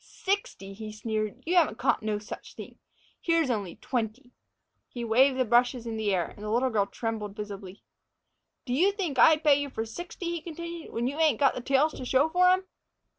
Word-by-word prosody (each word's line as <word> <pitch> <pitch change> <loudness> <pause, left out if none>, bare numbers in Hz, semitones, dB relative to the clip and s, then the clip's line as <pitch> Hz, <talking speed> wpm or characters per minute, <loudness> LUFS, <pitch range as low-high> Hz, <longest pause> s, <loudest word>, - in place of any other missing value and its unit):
"Sixty!" 380 - -3
he 215 +1 -7
sneered. 215 +2 -3
"You 350 +3 0
haven't 315 -10 +3
caught - - +1
no 215 -1 -1
such 210 0 -9
thing! - - -10 0.4
Here's 330 -5 +2
only 200 -6 -3
twenty." 245 +1 -4 0.6
He 240 - -6
waved 255 +4 +4
the 255 - +2
brushes 240 +1 +2
in 230 -1 -4
the 215 -2 0
air, 180 -3 +1
and - - -13
the 210 - -4
little 250 +4 +1
girl 205 -3 +1
trembled 215 -3 -4
visibly. 200 -2 -8 0.8
"Did 250 -1 -1
you 380 +6 +4
think 350 -10 -3
I'd 315 -1 +6
pay 290 -2 +5
you 285 - -3
for 225 -4 -4
sixty," 345 +7 -6
he 340 -2 -3
continued, 335 +1 -7
"when 235 - -2
you 280 +5 -2
ain't 310 -7 +3
got 275 - +4
the - - -5
tails 275 +4 +2
to - - -7
show 270 +5 +3
for 360 +2 +4
'em?" 370 +1 +3
250 Hz, 205 wpm, -28 LUFS, 215-315 Hz, 0.8 s, I'd